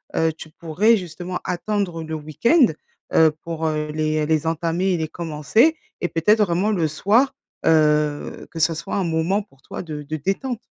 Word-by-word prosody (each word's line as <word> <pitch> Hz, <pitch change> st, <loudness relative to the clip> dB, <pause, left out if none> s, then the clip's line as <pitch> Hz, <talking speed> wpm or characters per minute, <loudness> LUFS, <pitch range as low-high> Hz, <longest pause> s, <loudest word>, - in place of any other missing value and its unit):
heu, 160 Hz, 0 st, +2 dB
tu 160 Hz, 0 st, -11 dB
pourrais 175 Hz, +8 st, +2 dB
justement 180 Hz, 0 st, -5 dB
attendre 180 Hz, -2 st, -2 dB
le 160 Hz, 0 st, -6 dB
week-end, 195 Hz, -, +3 dB, 0.5 s
heu, 160 Hz, -1 st, +6 dB
pour, 165 Hz, -1 st, -3 dB
heu, 155 Hz, -1 st, -1 dB
les 155 Hz, 0 st, 0 dB
les 160 Hz, 0 st, +1 dB
entamer 170 Hz, +3 st, 0 dB
et -, -, +1 dB
les 160 Hz, -1 st, -2 dB
commencer 170 Hz, -, +2 dB, 0.2 s
et 175 Hz, -, 0 dB
peut-être 210 Hz, +7 st, +2 dB
vraiment 180 Hz, +3 st, 0 dB
le 170 Hz, -6 st, +1 dB
soir, 215 Hz, -, +2 dB, 0.3 s
heu, 150 Hz, -2 st, +2 dB
que 165 Hz, -, -6 dB
ça 165 Hz, +1 st, +2 dB
soit 165 Hz, -, -5 dB
un 195 Hz, -, +1 dB
moment 170 Hz, +4 st, +1 dB
pour 140 Hz, -10 st, -21 dB
toi -, -, -7 dB
de 155 Hz, -4 st, -6 dB
de 155 Hz, +2 st, -4 dB
détente? 195 Hz, -, -2 dB
165 Hz, 180 wpm, -22 LUFS, 155-190 Hz, 0.5 s, heu